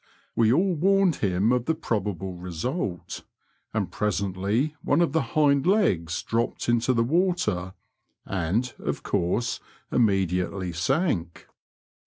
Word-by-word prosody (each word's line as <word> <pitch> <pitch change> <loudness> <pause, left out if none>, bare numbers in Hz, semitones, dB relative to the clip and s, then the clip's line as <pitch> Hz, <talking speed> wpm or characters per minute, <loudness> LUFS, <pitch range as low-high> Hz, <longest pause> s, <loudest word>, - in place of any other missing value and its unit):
We 115 -1 +4
all 180 +8 +3
warned 190 +1 +3
him 100 +3 +1
of 125 -1 +1
the 160 - +1
probable 100 - -2
result, 90 - -4 0.5
and - - -2
presently 105 +7 -1
one 145 - +2
of 170 -4 +3
the 160 - +2 0.2
hind 140 -1 +4
legs 90 - +2
dropped 115 +1 -1
into 120 +1 +2
the 115 -2 +2
water, 125 - 0 0.5
and, 100 +7 -1
of - - -3
coarse, 110 +7 0 0.3
immediately 95 -4 +1
sank. 95 - -1
115 Hz, 120 wpm, -26 LUFS, 90-150 Hz, 0.5 s, We